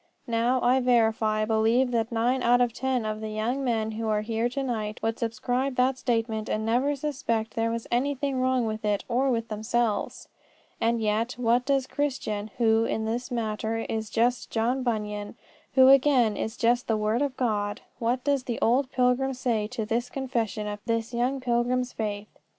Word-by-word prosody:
Now, 235 +2 +1
I 250 +2 +4
verify 220 -3 +2
believe 225 +4 +2
that 230 0 0
nine 240 +3 +1
out 245 +1 +4
of 245 -2 +2
ten 255 -2 -1
of 215 0 -3
the 220 - -4
young 225 +6 -2
men 225 -3 0
who 220 +1 -4
are 210 -1 +1
here 225 +2 -1
to 275 +3 -3
night 215 -4 -3
would 225 0 -1
subscribe 245 +3 -1
that 255 +1 +2
statement 225 -3 -1
and 215 0 -1
never 255 +6 +1
suspect 245 -6 -2
there 230 0 0
was 230 0 -3
anything 275 +1 0
wrong 255 -2 +2
with 215 0 -4
it 205 -1 0
or 255 +3 +1
with 230 -2 -1
themselves. 220 0 -1 0.5
And 230 +1 +1
yet, 220 +4 0
what 245 +1 +1
does 275 -2 +2
Christian, 250 -8 -2
who, 225 -2 +3
in 220 - -2
this 235 +4 -3
matter, 220 -2 -2
is 220 -1 -3
just 240 +2 +1
John 240 +4 0
Bunyan, 210 -4 -3 0.4
who 260 0 +7
again 265 -5 +5
is 220 +3 -4
just 240 +1 +2
the 220 - +1
word 215 +4 0
of 280 -2 -1
God 205 -4 -1 0.2
what 245 +2 0
does 280 -2 0
the 235 - -2
old 255 +3 +2
pilgrim 255 +1 +1
say 230 -4 -1
to 230 -1 -4
this 235 +3 -1
confession 235 -5 -2
of 205 0 -4
this 230 +1 -1
young 250 +3 0
pilgrim's 250 0 0
faith? 210 -2 -3
235 Hz, 185 wpm, -27 LUFS, 220-255 Hz, 0.5 s, who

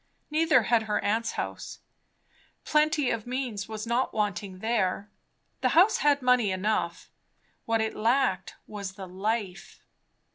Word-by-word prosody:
Neither 310 -5 +4
had 230 +2 +3
her 210 - +1
aunt's 225 +3 0
house. - - -5 0.9
Plenty 300 -2 +2
of 230 0 -3
means 245 -5 -3
was 215 0 -5
not 235 +2 0
wanting 205 -3 -2
there; 205 -2 -1 0.5
the - - +2
house 385 +6 +6
had 285 -2 +2
money 250 -4 +3
enough; 185 -2 -2 0.5
what 225 -1 +1
it 220 - -2
lacked 250 +4 +1
was 200 -2 -6
the 190 -1 -9
life. 195 0 -4
220 Hz, 135 wpm, -27 LUFS, 200-250 Hz, 0.9 s, house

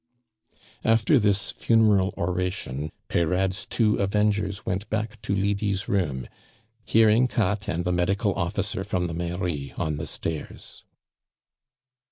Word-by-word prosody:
After 115 +5 +4
this 100 -2 +1
funeral 105 -4 +3
oration, 90 -5 -2 0.2
Peyrade's 90 +3 0
two 110 -3 +2
avengers 100 0 0
went 95 +3 -2
back 110 0 -3
to 100 - -1
Lydie's 100 0 0
room, 75 -11 -1 0.6
hearing 115 +3 +4
Katt 105 -3 0
and 85 +2 -1
the 90 - +1
medical 100 +4 +1
officer 95 +2 -2
from 90 -3 -1
the 85 - -3
Mairie 85 -5 -3
on 75 -2 -1
the 80 +1 -4
stairs. 80 +1 -6
95 Hz, 120 wpm, -25 LUFS, 85-105 Hz, 0.6 s, After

